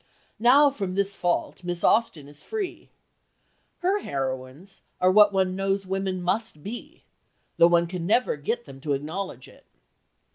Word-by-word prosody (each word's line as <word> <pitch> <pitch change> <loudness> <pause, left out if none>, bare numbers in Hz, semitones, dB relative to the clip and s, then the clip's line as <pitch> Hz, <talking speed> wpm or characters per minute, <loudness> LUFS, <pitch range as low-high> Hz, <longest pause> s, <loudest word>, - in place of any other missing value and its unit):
Now 275 +5 +6
from 195 -8 -4
this 200 0 0
fault 175 0 -2
Miss 175 -1 -4
Austin 190 -11 +2
is 145 0 -11
free. 420 -4 -5 0.9
Her 380 +3 +2
heroines 135 - -5 0.2
are 185 0 +4
what 205 +1 +7
one 190 -1 +1
knows 195 0 -1
women 190 -1 -2
must 185 -4 -2
be, 230 +4 -8 0.5
though 170 - +7
one 170 0 +3
never 180 +7 0
can 145 - -17
get 235 +8 -2
them 135 0 -12
to 145 0 -1
acknowledge 150 -1 -5
it." - - -19
185 Hz, 150 wpm, -25 LUFS, 155-210 Hz, 0.9 s, what